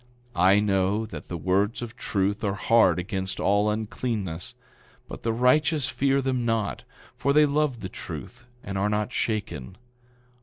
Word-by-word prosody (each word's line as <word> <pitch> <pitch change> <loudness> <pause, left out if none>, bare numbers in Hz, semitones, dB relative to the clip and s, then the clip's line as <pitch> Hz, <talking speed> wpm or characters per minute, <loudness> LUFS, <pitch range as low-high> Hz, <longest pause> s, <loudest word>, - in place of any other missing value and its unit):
I 95 +3 +5
know 100 +1 +1
that 110 - -9
the 85 - -4
words 100 +7 0
of 120 0 -7
truth 100 -3 -1
are 100 -2 0
hard 115 +1 +4
against 95 +1 -3
all 100 +2 +3
uncleanness; 105 -5 -3 0.5
but - - -8
the 115 - 0
righteous 135 +4 +3
fear 135 0 +1
them 130 -2 0
not, 115 -3 -1 0.3
for 140 - +1
they 150 +1 +6
love 145 -4 0
the 95 - -4
truth 120 - -8 0.2
and 100 -1 -3
are 105 +2 +1
not 105 +3 -1
shaken. 95 - -3
105 Hz, 155 wpm, -26 LUFS, 95-120 Hz, 0.5 s, they